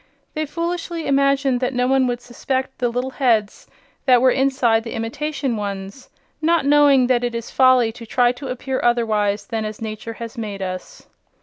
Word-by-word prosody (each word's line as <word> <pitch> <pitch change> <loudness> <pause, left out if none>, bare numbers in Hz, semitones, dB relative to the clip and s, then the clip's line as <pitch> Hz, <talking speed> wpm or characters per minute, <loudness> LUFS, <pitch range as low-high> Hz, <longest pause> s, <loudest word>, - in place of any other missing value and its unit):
They 310 -1 -2
foolishly 335 +1 -3
imagined 275 -2 +2
that 255 +1 -2
no 250 0 +2
one 265 0 +3
would 245 0 -2
suspect 260 +2 -4
the 245 -2 +1
little 250 +2 -3
heads 230 -7 0 0.4
that 250 -2 +6
were 255 +1 +4
inside 260 -4 +2
the 230 - -6
imitation 265 +3 -3
ones, 200 +3 -6 0.3
not 330 -1 +2
knowing 285 -2 +5
that 245 -1 +1
it 240 -1 -2
is 230 0 -5
folly 255 -3 +4
to 230 0 -11
try 245 +2 +3
to 270 +3 -8
appear 260 +1 -3
otherwise 215 -4 +1
than 225 0 -3
as 215 0 -5
nature 220 +1 -6
has 230 +2 -8
made 205 -3 -5
us. 185 -1 -7
250 Hz, 180 wpm, -21 LUFS, 225-270 Hz, 0.4 s, that